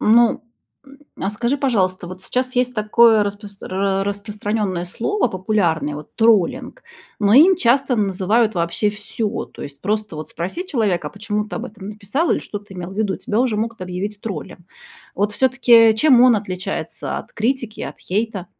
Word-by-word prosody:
Ну, 230 +2 +4 0.4
м, 275 0 -17 0.2
а 195 - -1
скажи, 235 +6 -1
пожалуйста, 190 -10 0
вот 185 0 -10
сейчас 255 +2 -2
есть 250 0 +1
такое 220 0 +4
распро 200 -1 -3
распространенное 205 -2 -2
слово 240 - -1
популярное, 175 -7 0
вот, 150 +1 -10
троллинг, 225 - +2 0.4
но 205 0 +3
им 345 +7 +8
часто 265 -1 +2
называют 210 +2 +1
вообще 170 +5 0
всё, 210 +1 -4
то - - -12
есть 140 0 -9
просто 210 -4 -2
вот 155 - -7
спроси 190 - -5
человека: 200 - 0
"А - - -18
почему 210 0 -3
ты - - -7
об 240 +2 -4
этом 205 -3 -10
написал?" 220 - -2
Или - - 0
"Что 205 - -6
ты 200 -1 -15
имел 180 0 -6
в - - -9
виду?"- 200 -4 0
тебя 210 - -2
уже 240 -4 +1
могут 225 -1 -3
объявить 190 +3 -5
троллем. 185 -4 -7 0.5
Вот 205 +2 0
всё-таки 235 -2 +5
чем 255 -1 +5
он 250 -2 +7
отличается 190 -3 -4
от - - -12
критики 230 -1 -2
и - - -4
от - - -8
хейта? 200 -1 -2
210 Hz, 175 wpm, -20 LUFS, 190-235 Hz, 0.5 s, им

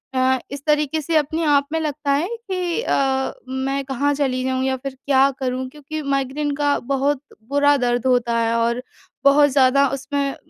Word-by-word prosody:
अ, 260 0 +2
इस 280 0 -7
तरीके 300 0 +1
से 325 +2 -2
अपने 310 +2 0
आप 285 -2 +3
में 325 - +1
लगता 295 -2 -2
है 290 +5 +1 0.2
कि 365 +1 -1
अ, 265 - 0
मैं 265 +1 -2
कहाँ 280 +2 0
चली 265 -3 -1
जाऊँ 260 0 -1
या 265 0 +1
फिर 270 +1 -7
क्या 275 -1 +4
करूँ? 255 0 -2
क्योंकि 300 +2 -7
माइग्रेन 280 +1 -1
का 290 0 +1
बहुत 275 0 +1 0.3
बुरा 285 +1 +4
दर्द 245 -2 0
होता 245 -2 +2
है 230 0 +1
और 235 +1 0 0.4
बहुत 290 +1 +6
ज़्यादा 275 +1 +4
उसमें 275 +1 -2
275 Hz, 175 wpm, -21 LUFS, 260-290 Hz, 0.4 s, बहुत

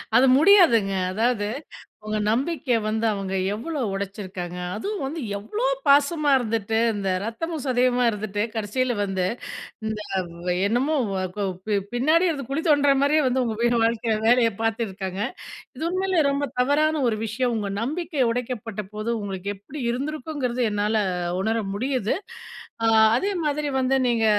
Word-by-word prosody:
அது 250 +3 +7
முடியாதுங்க. 300 - +5 0.2
அதாவது 220 0 +1 0.6
உங்க 215 0 -1
நம்பிக்கைய 260 +1 +1
வந்து 220 +1 0
அவங்க 195 -2 -3 0.2
எவ்வளோ 285 +7 -4
உடைச்சிருக்காங்க? 190 -3 -5 0.2
அதுவும் 400 - -3
வந்து 305 +5 -4 0.2
எவ்ளோ 415 - -3 0.2
பாசமா 290 +1 +4
இருந்துட்டு, 220 -2 -1 0.2
இந்த 200 -2 -2
ரத்தமும் 295 +7 -4
சதயுமா 250 -1 +2
இருந்துட்டு, 205 -1 -3
கடைசியில 235 +4 -1
வந்து 190 -2 -1 0.6
இந்த 220 -1 -2 0.5
வ - - -1 0.2
என்னமோ 255 +9 +1 0.2
வ - - -2 0.2
கொ 205 - -2 0.3
பி 210 - +2 0.2
பின்னாடியே 315 +8 +3
இருந்து 280 -5 -4
குழி 290 +4 -1
தோண்டுற 285 -2 +5
மாதிரியே 300 +2 +3
வந்து, 255 0 +1
உங்க 225 -2 -2 0.3
வாழ்க்கையில 230 -1 +1
வேலைய 235 0 +5
பார்த்துருக்காங்க. 200 -4 -2 0.6
இது 320 - -3
உண்மையிலயே 370 -3 +1
ரொம்ப 280 0 0
தவறான 300 +4 +2
ஒரு 215 - -1
விஷயம். 240 +3 -1
உங்க 205 -2 -3
நம்பிக்கை 295 +1 -1
உடைக்கப்பட்டபோது 220 -3 -4
உங்களுக்கு 195 -1 -5
எப்படி 265 +9 -9
இருந்திருக்குங்கிறது, 265 -1 -3
என்னால 210 +1 0 0.5
உணர 220 +3 0 0.2
முடியுது. 250 0 0 0.7
அ - - +4 0.3
அதே 390 +11 0
மாதிரி 295 0 0
வந்து 260 +1 +2
நீங்க 230 -2 +2
240 Hz, 140 wpm, -24 LUFS, 210-285 Hz, 0.7 s, அது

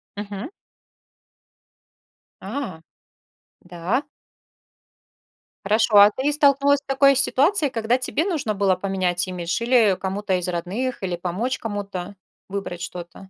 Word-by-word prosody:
Мгм. 205 +3 -6 1.9
А, 200 - -5 0.8
да. 180 - -2 1.6
Хорошо. 215 +1 +3
А 205 +1 +9
ты 275 +3 0
столкнулась 285 -1 +3
с - - -44
такой 275 0 +4
ситуацией, 285 +5 +2
когда 230 +1 +1
тебе 260 +4 -1
нужно 310 - -1
было 195 -2 +2
поменять 185 -1 -1
имидж, 175 +1 -3
или 230 -6 +4
кому-то 195 +1 -2
из 180 0 -4
родных, 195 +9 -3
или 180 -2 -1
помочь 185 +9 -2
кому-то 200 -4 -5 0.3
выбрать 190 -3 -5
что-то? 175 +2 -8
205 Hz, 115 wpm, -23 LUFS, 185-260 Hz, 1.9 s, А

